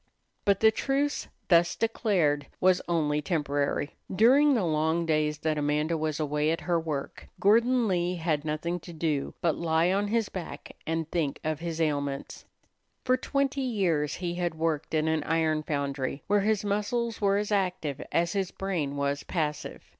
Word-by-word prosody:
But 200 -1 +3
the 220 0 +7
truce, 280 +5 -1 0.2
thus 170 -1 +4
declared, 180 - +1
was 185 0 +4
only 150 -3 +1
temporary. 145 -2 -1
During 265 +8 +5
the 220 - +1
long 160 +1 +1
days 155 -1 +1
that 155 -1 0
Amanda 150 +3 0
was 155 -1 -2
away 150 0 0
at 165 - -1
her 175 -2 +1
work, 155 -4 -5
Gordon 235 +4 +4
Lee 180 -1 0
had 160 -3 -1
nothing 155 +3 -2
to 175 +1 -11
do 155 -3 -2
but 165 -4 +2
lie 165 +1 +2
on 200 +2 +1
his 225 0 +1
back 180 -4 -8
and 165 -1 -1
think 155 -5 -1
of 155 -1 -1
his 165 -1 -4
ailments. 145 -3 -2 0.6
For 255 0 +4
twenty 275 +1 -1
years 185 - 0
he 175 -1 -3
had 175 -2 -2
worked 160 -1 -1
in 155 0 +1
an 160 -1 +1
iron 160 -1 +1
foundry, 140 -2 -3
where 205 0 +2
his 210 0 +1
muscles 210 +3 -1
were 200 -1 +3
as 210 +1 -2
active 180 -8 -1
as 170 0 +1
his 195 -2 -1
brain 165 -8 -3
was 140 0 -1
passive. 150 -4 -3
165 Hz, 170 wpm, -28 LUFS, 150-200 Hz, 0.6 s, the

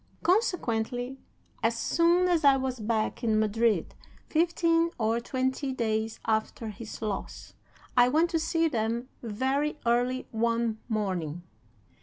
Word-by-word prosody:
Consequently, 255 - 0 0.4
as - - +1
soon 345 +2 +3
as 345 -3 +2
I 275 -1 +6
was 260 -2 -3
back 220 +2 -1
in 220 -2 +2
Madrid, 215 -3 +1 0.3
fifteen 335 0 +2
or 225 0 +1
twenty 260 +3 -2
days 220 -2 -1
after 220 0 -1
his 215 +1 -8
loss, 210 -2 -5 0.4
I 245 0 +6
went 320 +5 +2
to 330 - +1
see 330 +1 +1
them 235 -2 -2
very 265 +7 -1
early 245 +2 +1
one 230 0 0
morning. 180 -7 -2
240 Hz, 125 wpm, -28 LUFS, 220-295 Hz, 0.4 s, I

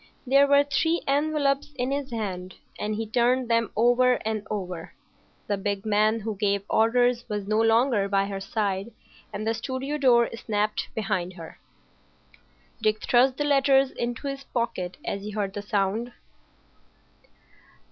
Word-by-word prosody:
There 275 +2 +5
were 280 0 +5
three 320 +4 0
envelopes 285 0 0
in 255 0 -2
his 280 -1 -2
hand, 190 -6 -5 0.2
and 210 0 -2
he 225 +1 -3
turned 240 +2 +1
them 230 -1 +2
over 245 +3 +4
and 220 -1 -1
over. 180 -5 -5 0.5
The 205 - -1
big 200 0 -3
man 215 +1 +2
who 220 0 -4
gave 200 -1 0
orders 240 +2 +3
was 210 -2 -3
no 215 +1 +2
longer 225 -2 +3
by 195 0 +2
her 195 -1 -4
side, 200 +1 -2 0.4
and 210 +1 -5
the 225 - +1
studio 260 +5 -4
door 240 -4 +5
snapped 215 -2 -2
behind 195 -4 -2
her. 165 -3 -11 1.2
Dick 215 0 +1
thrust 255 +1 +3
the 295 - 0
letters 275 -2 +3
into 240 +4 -4
his 275 0 -5
pocket 185 -9 -3
as 200 - -3
he 210 - -6
heard 200 -2 -3
the 205 - -4
sound. 205 +3 -1
225 Hz, 150 wpm, -26 LUFS, 205-260 Hz, 1.2 s, There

